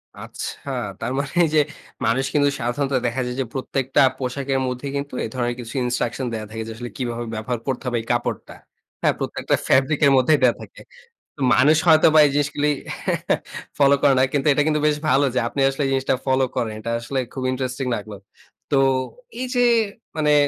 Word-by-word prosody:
আচ্ছা - - -7 0.3
তার 120 - -3
এই 135 - -2
মানে 175 +5 +2
যে - - +6 0.5
মানুষ 120 +4 +1
কিন্তু 145 -1 +3
সাধারণত 135 +4 -1
দেখা 125 +3 -2
যায় 125 0 -4
যে - - -2
প্রত্যেকটা 135 0 0 0.2
পোশাকের 135 +1 -2
মধ্যে 125 +2 -4
কিন্তু 140 -1 -4
এ - - -3
ধরনের 120 -1 -1
কিছু 120 -1 -7
Instruction 125 +1 -2
ন - - -2
দেয়া 110 -1 -4
থাকে। 110 0 -5
যে - - -6
আসলে 120 +1 -7
কিভাবে 120 -2 -3
ব্যবহার 110 +2 -3
করতে 130 -2 -2
হবে 120 -1 0
এই - - -13
কাপড়টা। 120 0 -2 0.5
হ্যাঁ - - +3
প্রত্যেকটা - - -1
ফেব্রিক 135 +3 +3
এর 140 - +6
মধ্যেই 145 +4 +4
দেয়া 125 -2 +5
থাকে। - - -12 0.7
মানুষ 150 +4 +5
হয়তো 160 -1 +7
বা 155 - +7
এই 145 - +2
জিনিসগুলি 145 0 +1 1.1
ফলো 140 -1 +5
করে 140 - +5
না - - +5
কিন্তু 145 0 +1
এটা 150 - +2
কিন্তু 150 -1 +2
বেশ 150 - +2
ভালো 140 +1 +4
যে - - +3
আপনি 140 - -5
আসলে 135 +2 -4
এই - - 0
জিনিসটা 135 0 +1
ফলো 130 0 +2
করেন 110 -2 -1
এটা 115 +2 -4
আসলে 130 +3 -3
খুব 130 - -4
Interesting 130 0 -3
লাগলো। 105 0 -7 0.6
তো 140 - +3 0.6
এই 255 - -1
যে 245 0 +4 0.5
মানে 150 -1 +3
130 Hz, 195 wpm, -22 LUFS, 120-140 Hz, 1.1 s, হয়তো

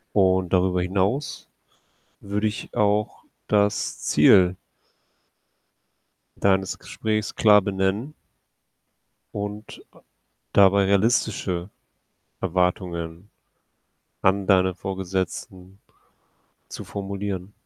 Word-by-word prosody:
Und 95 -2 +2
darüber 90 -1 +2
hinaus 100 +10 -2 0.7
würde 105 +2 -2
ich 105 - -4
auch 105 0 0 0.2
das 105 -1 +1
Ziel 90 -1 +5 1.9
deines 95 -2 +1
Gesprächs 110 -1 -3
klar 105 -2 +5
benennen 100 +8 -2 1.2
und 105 +1 -7
a - - -21 0.5
dabei 100 0 +5
realistische 100 -3 0 0.7
Erwartungen 90 -1 -2 0.9
an 95 0 +2
deinen 95 -1 +3
Vorgesetzten 95 0 -5 0.9
zu - - -8
formulieren. 100 -1 -5
95 Hz, 75 wpm, -24 LUFS, 95-105 Hz, 1.9 s, Ziel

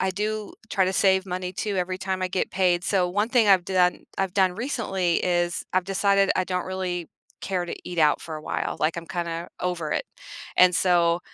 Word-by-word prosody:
I 190 - +1
do 210 +2 -3 0.2
try 195 - +2
to 185 - 0
save 190 0 +3
money 180 0 -4
too 205 +1 -3
every 185 0 -2
time 190 0 -3
I 185 - 0
get 185 0 -1
paid, 180 -2 +2
so 185 -3 +2
one 205 +5 0
thing 235 -4 +3
I've 185 -3 +5
done 180 -2 +1
I've 195 -1 -1
done 190 -2 +3
recently 195 - -1
is 175 -1 0
I've 185 0 +2
decided 195 +1 +2
I 185 - +1
don't 180 0 -2
really 185 -2 -3 0.3
care 185 -2 -2
to 175 - -5
eat 175 -1 -6
out 150 -2 +4
for 160 -1 -6
a 155 - -9
while, - - -3
like, 155 +2 +1
I'm 170 0 -6
kinda 170 -2 -4
over 175 -4 -2
it, - - -1 0.5
and 180 -1 +6
so, 175 -1 +3
185 Hz, 210 wpm, -25 LUFS, 175-195 Hz, 0.5 s, and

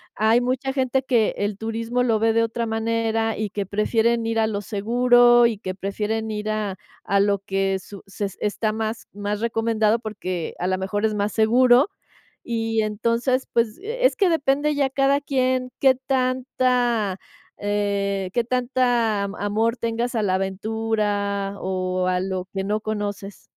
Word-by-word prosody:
Hay 220 +2 +4
mucha 255 +2 -1
gente 265 -1 +1
que 240 -4 +2
el 205 -1 -2
turismo 225 +2 -2
lo 225 -3 +2
ve 225 0 +3
de 230 0 +3
otra 230 +1 -2
manera, 225 0 -1
y 215 -1 -2
que 200 0 -3
prefieren 225 +3 +1
ir 225 0 0
a 220 - +3
lo 205 -2 -2
seguro, 240 +3 +4
y 225 -3 -3
que 185 -3 -5
prefieren 215 +3 -3
ir 210 0 -3
a 210 -3 -2 0.3
a 200 0 +1
lo 200 0 +2
que 195 0 -1
su 200 +1 -12
se 195 +1 -6
es 195 - -7
está 215 +1 -1
más 220 +1 -4
más 205 +1 -4
recomendado 225 -1 +1
porque 185 -6 -5
a 180 - -1
la 185 - +1
mejor 190 +2 -2
es 215 - +1
más 205 0 -1
seguro, 245 - +5 0.6
y 225 -2 -1
entonces, 230 +5 0
pues, 230 -2 +1
e - - -1
es - - +4
que 390 -3 +3
depende 295 -2 +1
ya 280 -2 +1
cada 275 +1 +2
quien 255 -2 0
qué 265 -1 +6
tanta, 255 -5 0 0.4
eh, 200 -2 -1
qué 240 - +1
tanta 245 -4 +1
am 200 +1 -4
amor 220 +3 0
tengas 235 +2 -2
a 220 - +1
la 185 -2 +1
aventura 200 0 -1
o 185 -1 -1
a 180 0 +1
lo 190 -1 -3
que 195 -1 -2
no 210 +2 -1
conoces. 205 -2 -4
220 Hz, 170 wpm, -23 LUFS, 205-240 Hz, 0.6 s, qué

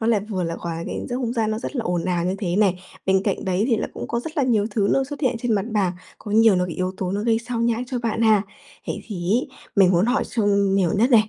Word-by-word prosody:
nó 220 - -1
lại 225 -3 +3
vừa 185 -3 -1
là 165 0 -2
hòa 165 -1 -4
quyện - - -4
giữa 245 - -2
không 245 -2 -2
gian 225 -3 0
nó 215 - -1
rất 275 - -5
là 240 - 0
ồn 175 -3 -1
ào 175 -2 0
như 185 +1 0
thế 180 -4 -1
nè, 205 -3 +4 0.3
bên 190 0 +3
cạnh - - -1
đấy 190 +2 +1
thì 235 - +3
là 220 - -2
cũng - - -6
có 235 - -1
rất 320 +6 -8
là 285 - +2
nhiều 225 -5 +2
thứ 205 -1 +1
nó 270 - +2
xuất 285 +2 -7
hiện 255 -5 +1
trên 235 0 -1
mặt 200 -1 0
bàn, 195 -4 +1 0.3
có 210 - -8
nhiều 220 -1 +5
nó 180 0 +1
bị 170 - -5
yếu 185 0 -2
tố 185 -1 -2
nó 200 +1 -1
gây 225 0 +2
xao 235 0 -4
nhãng 235 +1 +1
cho 255 -1 -3
bạn 230 -1 -1
ha. 215 -3 +5 0.4
Vậy - - -3
thì 180 -5 -4
ấy, 255 +5 0 0.3
mình 190 -2 +6
muốn 175 +4 +3
hỏi 250 +3 +1
sâu 220 -4 -1
nhiều 195 -3 +2
nhất 235 +6 +3
này, 215 -3 +5
215 Hz, 305 wpm, -23 LUFS, 190-235 Hz, 0.4 s, mình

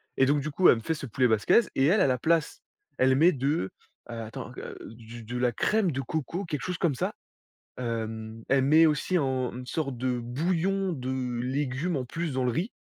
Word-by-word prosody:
et 130 - +3
donc 145 0 +2
du 155 +2 -4
coup, 180 +5 +5
elle - - +7
me 115 - -6
fait 160 - -1
ce 140 -4 -6
poulet 125 +3 +2
basquaise 110 - +3
et 135 - +2
elle 195 +7 +4
à - - +4
la 125 -1 +1
place, 160 +2 +1 0.4
elle 130 0 +4
met 165 +6 +5
de 140 - -1 0.4
attends, 115 -2 -7
heu, - - -7
du 115 +1 -11
de 120 +3 -5
la 125 0 +2
crème 205 - +1
de 135 -1 -2
coco, 160 +5 -3
quelque 150 -5 -3
chose 180 -1 -3
comme 160 -7 +1
ça. - - -2 0.7
Hem, 110 -2 -4
elle 135 0 +4
met 155 +4 +6
aussi 160 +4 +1
en 130 -3 -1
une 125 - -7
sorte 140 -5 -3
de 125 0 -1
bouillon 175 +9 -1
de 130 -3 -3
légumes 140 +5 -1
en 130 - -3
plus 165 +3 -4
dans 130 0 0
le - - +2
riz 170 - -1
135 Hz, 215 wpm, -27 LUFS, 125-160 Hz, 0.7 s, elle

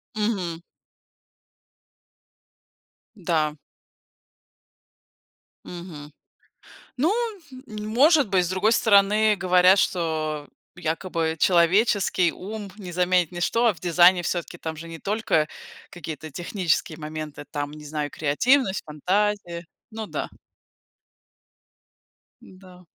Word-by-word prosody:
Мгм. 195 -6 -2 2.6
Да. 160 -5 0 2.1
Мгм. 170 -4 -9 0.9
Ну, 310 +8 +2 0.6
может 235 +8 +3
быть. 185 -3 +2
С - - -4
другой 190 +4 +2
стороны, 210 0 +4
говорят, 185 +1 +5
что 155 -4 -1 0.3
якобы 165 -1 -2
человеческий 185 +1 +3
ум 205 +1 -7
не 185 -4 -8
заменит 180 -1 +2
ничто, 205 +7 +1
а 220 - +3
в 160 - -17
дизайне 175 +1 +5
всё-таки, 175 0 -3
там 160 -1 -5
же 165 +2 -8
не 165 -1 -9
только 200 -7 0 0.4
какие-то 155 -2 -8
технические 170 -1 -1
моменты, 155 -1 -7
там, 145 -1 -3
не 150 0 -11
знаю, 150 0 -3
креативность, 195 - +1
фантазия. 180 +2 -1 0.3
Ну 220 -1 -6
да. - - -4 2.1
Да. 185 -1 -16
180 Hz, 95 wpm, -24 LUFS, 160-205 Hz, 2.6 s, говорят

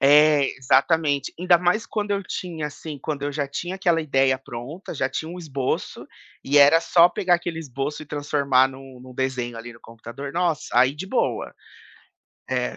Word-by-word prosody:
É, 145 0 +6
exatamente. 140 +2 +2
Ainda 180 0 +5
mais 180 +6 +1
quando 210 -1 -3
eu 200 0 0
tinha, 170 -5 -5
assim 150 0 -8
quando 140 +1 -4
eu 145 - -1
já 145 0 -2
tinha 175 +6 -5
aquela 175 -4 +2
ideia 135 -3 +2
pronta, 135 +7 -8
já 135 -3 -1
tinha 155 +4 -4
um 180 - -8
esboço 140 -6 -3 0.4
e 145 +2 +3
era 145 +3 +7
só 170 0 +5
pegar 180 0 +1
aquele 175 -1 -3
esboço 145 0 -4
e 155 - -12
transformar 140 -3 +2
num 135 -1 -12
num 130 0 -13
desenho 125 -2 -2
ali 120 +1 -8
no 115 - -17
computador 120 +5 -9
nossa, 170 -4 0
aí 130 +3 +4
de 175 +6 -7
boa. 255 - -1 1.0
É. - - -1
145 Hz, 180 wpm, -23 LUFS, 135-170 Hz, 1.0 s, era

